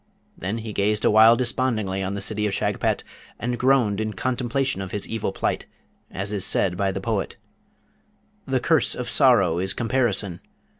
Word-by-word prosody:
Then 95 +4 -4
gazed 105 -1 -1
he - - +4
awhile 110 +2 +7
despondingly 120 -6 -1
on 95 +1 -3
the 100 - -4
city 105 +1 0
of 100 - -2
Shagpat, - - -1 0.4
and 120 0 -3
groaned 125 -6 +2
in 110 0 -3
contemplation 130 +1 -1
of 95 - -5
his 105 +1 -3
evil 115 -1 -3
plight, - - -2 0.4
as 100 +3 -3
is 100 -3 +1
said 95 -2 +2
by 95 +1 0
the 95 - -4
poet: 105 0 -3 1.1
The - - +1
curse - - +1
of - - -3
sorrow 85 - +4
is 95 +1 -1
comparison! 115 -7 -1
105 Hz, 165 wpm, -23 LUFS, 95-120 Hz, 1.1 s, awhile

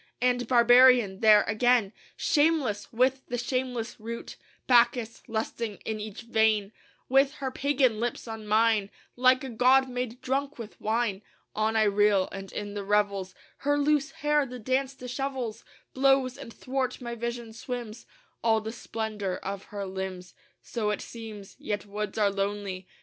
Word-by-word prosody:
And 245 -1 +1
barbarian 245 -4 +6
there 215 -1 +7
again, 225 -1 +2 0.2
Shameless 290 -9 +1
with 255 +3 +2
the 245 - -3
shameless 245 -1 -2
rout, 230 +2 -7 0.3
Bacchus 240 -2 +3
lusting 225 -1 -3
in 220 -1 -3
each 210 0 -7
vein, 220 -3 +2 0.4
With 270 +2 +3
her 270 -3 -4
pagan 260 -5 +1
lips 240 +1 -3
on 220 -1 -7
mine, 215 -1 +3 0.3
Like 255 +2 +4
a 265 - -5
god 255 +3 +4
made 250 -1 -4
drunk 275 +3 -2
with 230 -3 -10
wine, 220 -2 0 0.3
On 215 +1 +1
I 220 - +4
reel; 205 -2 +3
and 195 0 -8
in 205 -1 -5
the 205 -1 -4
revels 200 -2 0 0.2
Her 290 +1 +1
loose 295 0 +2
hair, 295 -2 +1
the 250 +1 -7
dance 260 +3 -1
dishevels, 255 -2 -4 0.3
Blows, 265 -1 +3
and 270 -4 -9
'thwart 255 +1 -3
my 240 -2 -5
vision 235 -1 -5
swims 240 -1 -6 0.4
All 225 -1 +4
the 220 +1 -5
splendor 215 -5 -4
of 195 0 -6
her 200 -1 -5
limbs.... 190 -1 -6 0.3
So 220 -3 -2
it 210 - -2
seems. 215 -4 -9
Yet 205 0 -3
woods 205 0 -5
are 205 -2 +3
lonely. 195 -1 -3
230 Hz, 155 wpm, -28 LUFS, 210-255 Hz, 0.4 s, there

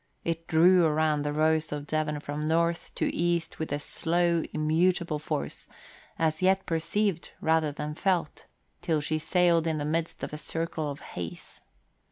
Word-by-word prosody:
It 165 0 -3
drew 175 +3 +6
around 155 -1 +2
the 145 0 -1
Rose 155 +1 +1
of 145 -1 -4
Devon 150 -1 -1
from 150 +1 -3
north 170 +1 +1
to - - 0
east 170 -1 -1
with 160 - -3
a 145 - +1
slow, 170 +3 +1
immutable 160 +1 +1
force, 70 - -4 0.5
as 155 -1 0
yet 190 +1 +3
perceived 175 +2 -1
rather 160 -1 +2
than 150 +1 -5
felt, 175 -1 -1 0.3
till 160 -3 +1
she 155 +1 -1
sailed 170 0 +3
in 160 -1 0
the 145 - -2
midst 165 +2 -2
of - - -4
a 150 - -5
circle 165 -1 -3
of 140 - -6
haze. 85 -2 -8
160 Hz, 165 wpm, -28 LUFS, 150-170 Hz, 0.5 s, drew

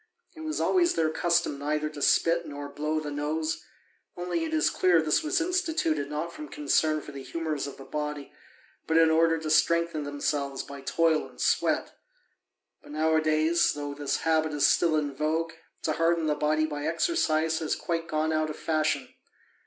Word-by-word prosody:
It 320 - -10
was 315 0 -3
always 350 -2 +3
their 160 -1 +1
custom 170 -4 +1
neither 150 +1 -1
to 150 -1 -8
spit 170 +4 +3
nor 145 0 -6
blow 150 +2 -2
the 150 -1 -5
nose, 155 +2 -2 0.6
only 180 - -2
it 320 - -3
is 315 -1 +2
clear 180 -2 +3
this 155 - +2
was 325 +4 0
instituted 320 - 0
not 155 +3 -4
from 305 0 -8
concern 155 - +1
for 150 - -10
the 140 -1 -8
humours 155 -1 -3
of 140 - -9
the 135 - -11
body, 150 -1 -5 0.5
but 160 - +2
in 165 -1 +5
order 165 0 +3
to 155 -1 -4
strengthen 170 -1 +2
themselves 145 -1 -2
by 140 -1 -9
toil 160 +2 +1
and 60 - -19
sweat. - - +1 0.9
But - - -12
nowadays, 155 +1 +2
though 145 -1 -5
this 145 -1 -2
habit 160 -1 +1
is 145 - +2
still 165 -2 +3
in 145 -2 -1
vogue, 160 +3 -1 0.3
to 155 - 0
harden 165 +1 +1
the 155 - +2
body 155 +1 +1
by 150 -1 -4
exercise 160 - +1
has 160 - -1
quite 165 -1 -3
gone 155 -1 0
out 155 0 0
of 155 - -5
fashion. 155 -4 -1
155 Hz, 180 wpm, -27 LUFS, 150-165 Hz, 0.9 s, in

